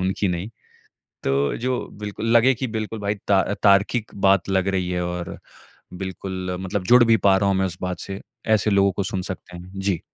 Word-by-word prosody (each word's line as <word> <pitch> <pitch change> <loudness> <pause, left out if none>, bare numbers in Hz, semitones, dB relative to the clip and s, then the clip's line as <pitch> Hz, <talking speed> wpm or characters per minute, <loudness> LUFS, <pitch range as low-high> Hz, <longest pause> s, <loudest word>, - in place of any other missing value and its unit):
उनकी 95 +1 0
नहीं। 90 +4 -3 0.7
तो 70 +1 +1
जो 125 +1 -1 0.2
बिल्कुल 105 +1 -5
लगे 120 +3 +6
कि 130 +2 -3
बिल्कुल 110 0 -4
भाई 100 +1 -1
ता 95 -1 +5 0.2
तार्किक 100 +3 +3 0.2
बात 95 -1 +3
लग 95 0 +1
रही 95 -2 0
है 90 -1 -1
और 90 0 -5 0.6
बिल्कुल 95 0 -5
मतलब 95 0 -2
जुड़ 125 0 +7
भी 115 -1 +5
पा 95 -1 +6
रहा 100 0 +2
हूँ 95 - +2
मैं 95 - +2
उस 90 -1 -4
बात 90 -1 -3
से 100 0 -6 0.3
ऐसे 105 +1 0
लोगों 100 0 +4
को 95 +2 -2
सुन 95 0 -3
सकते 90 -1 -9
हैं। 90 +2 -11
जी। 95 -4 0
95 Hz, 200 wpm, -23 LUFS, 90-105 Hz, 0.7 s, जुड़